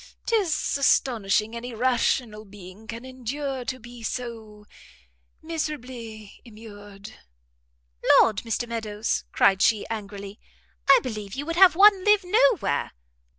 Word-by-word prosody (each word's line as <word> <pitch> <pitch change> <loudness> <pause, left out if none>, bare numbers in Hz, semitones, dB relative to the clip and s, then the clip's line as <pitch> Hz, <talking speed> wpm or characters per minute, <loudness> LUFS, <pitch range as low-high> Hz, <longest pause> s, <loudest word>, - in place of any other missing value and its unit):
'Tis 385 -10 0
astonishing 225 -5 +1
any 235 0 -7
rational 240 -2 0
being 200 +1 -14
can 230 +2 -8
endure 260 +1 -5
to 255 +1 -4
be 240 0 -13
so 225 -3 -7 0.8
miserably 250 -10 -6
immured." 210 -2 -13 1.0
"Lord, 215 -3 +3
Mr 230 +2 -3
Meadows," 220 -2 -3
cried 195 -1 +3
she, 220 -3 +2
angrily, 200 -1 -7 0.5
"I 275 - +8
believe 215 -6 -6
you 285 +2 -5
would 335 +1 -4
have 365 -1 +6
one 395 0 +6
live 420 -1 +4
no 460 +7 +3
where!" - - -2
235 Hz, 120 wpm, -24 LUFS, 215-275 Hz, 1.0 s, I